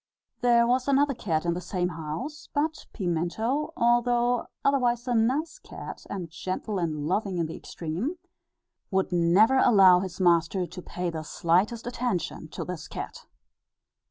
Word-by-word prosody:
There 240 -1 +4
was 255 +2 +1
another 280 0 +3
cat 165 -9 -2
in 170 - +1
the 180 - -4
same 180 0 -1
house; 165 - -6
but 305 +2 -1
Pimento, 200 - -1
although 240 0 +2 0.2
otherwise 245 -3 +2
a 245 - +1
nice 260 +8 +1
cat, - - -9
and 185 -4 -4
gentle 185 +4 -4
and 155 -4 -2
loving 190 +2 -1
in 170 - +1
the 160 - -6
extreme, 180 - -4 0.7
would 190 -1 0
never 180 +9 +4
allow 190 -7 +7
his 185 0 -5
master 175 +1 +3
to 180 +2 -9
pay 180 0 -4
the 160 -1 -4
slightest 180 +9 +1
attention 245 -9 -2
to - - -6
this 180 -4 -6
cat. - - -7
195 Hz, 150 wpm, -27 LUFS, 170-245 Hz, 0.7 s, allow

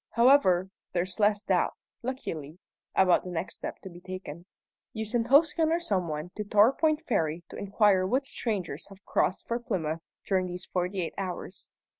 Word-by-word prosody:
However, 220 -7 +4 0.2
there's 180 +2 -2
less 205 0 +3
doubt, 190 -3 +1 0.3
luckily, 165 - -5 0.4
about 185 -2 +5
the 185 - -6
next 175 0 -3
step - - -6
to 190 - -7
be 175 - -11
taken. 185 -2 -8 0.5
You 220 0 -3
send 230 +2 0
Hosken 310 +4 +5
or 335 - +2
some 195 - 0
one 155 +2 -4
to 210 - -1
Torpoint 265 +10 +4
Ferry 165 - -1
to - - -9
inquire 200 -2 +3
what 260 +7 +1
strangers 190 - -3
have 195 0 -16
crossed 185 - 0
for 235 +1 -1
Plymouth 170 -10 -2 0.2
during 185 -2 +1
these 180 0 -6
forty 180 +1 -1
eight 165 - -4
hours. 185 0 -5
190 Hz, 170 wpm, -28 LUFS, 180-235 Hz, 0.5 s, about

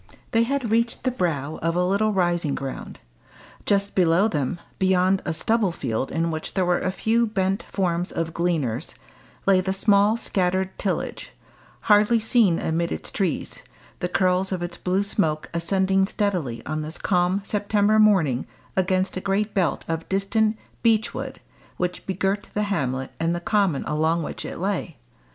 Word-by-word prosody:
They 230 - +3
had 250 -1 0
reached 230 +1 +1
the 255 - +1
brow 155 - -2
of 165 +1 0
a 180 - +2
little 200 +4 +2
rising 175 -6 +1
ground. 135 -2 -6 0.7
Just 200 0 +1
below 180 +2 +4
them, 155 -3 -2 0.2
beyond 190 0 +3
a - - -1
stubble 215 +4 +1
field 130 -5 -3
in 165 +1 0
which 155 0 -5
there 190 -2 +2
were 175 0 +2
a 185 - -1
few 230 +4 +1
bent 195 0 0
forms 175 -2 -1
of 165 -1 -3
gleaners, 165 -10 -1 0.5
lay 190 -1 +5
the 190 +1 -1
small 205 +2 +4
scattered 190 -3 -1
Tillage, 195 - -3 0.5
hardly 210 +2 +4
seen 220 -6 +3
amid 165 +1 -1
its - - -5
trees, 190 -6 -2 0.4
the 180 - -2
curls 185 +1 +1
of 180 -2 -2
its 175 0 -4
blue 185 +2 0
smoke 160 -7 -1
ascending 190 +3 +2
steadily 180 - -2
on 155 +1 -2
this 155 +2 -4
calm 180 +1 +1
September 210 +1 +2
morning 175 - +3 0.3
against 185 0 +1
a - - -3
great 200 +2 0
belt 175 -8 0
of 165 0 -3
distant 215 +3 +1 0.2
beechwood 225 -1 0 0.4
which 180 0 -3
begirt 195 +2 -1
the 210 - +1
hamlet 130 -5 -2
and 165 +1 +1
the - - -2
common 185 -5 +1
along 160 +2 0
which - - -6
it - - -6
lay. 180 -4 -2
185 Hz, 160 wpm, -24 LUFS, 165-205 Hz, 0.7 s, lay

